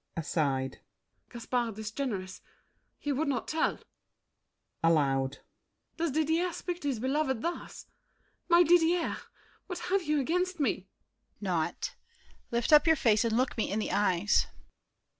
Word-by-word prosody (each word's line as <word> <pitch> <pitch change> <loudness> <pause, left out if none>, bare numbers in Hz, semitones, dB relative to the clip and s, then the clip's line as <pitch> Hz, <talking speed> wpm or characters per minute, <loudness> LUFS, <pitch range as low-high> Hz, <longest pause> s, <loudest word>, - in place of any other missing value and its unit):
[Aside.] 140 -5 -1 0.5
Gaspard 235 -2 -2
is 215 0 -5
generous: 200 -8 -4 0.6
he 290 - -3
would 285 +3 0
not 260 -5 -1
tell. 315 0 0 1.1
[Aloud.] 140 -4 +2 0.6
Does 335 0 0
Didier 320 +4 +1
speak 355 0 -5
to 290 - -3
his 270 -4 0
beloved 265 -1 0
thus? 340 +1 -5 0.6
My 345 +1 +7
Didier, 345 +1 +3 0.5
what 360 - -4 0.2
have 390 - +4
you 300 -3 +1
against 360 +5 0
me? 285 - +3
DIDIER. - - -14 0.5
Naught. 175 -5 -2 0.5
Lift 235 +5 +1
up 300 +2 +7
your 320 - +6
face 220 -6 +3
and 230 -1 +1
look 255 +1 +1
me - - 0
in 200 - -1
the 215 - -2
eyes. 200 -1 +2
260 Hz, 140 wpm, -30 LUFS, 205-320 Hz, 1.1 s, My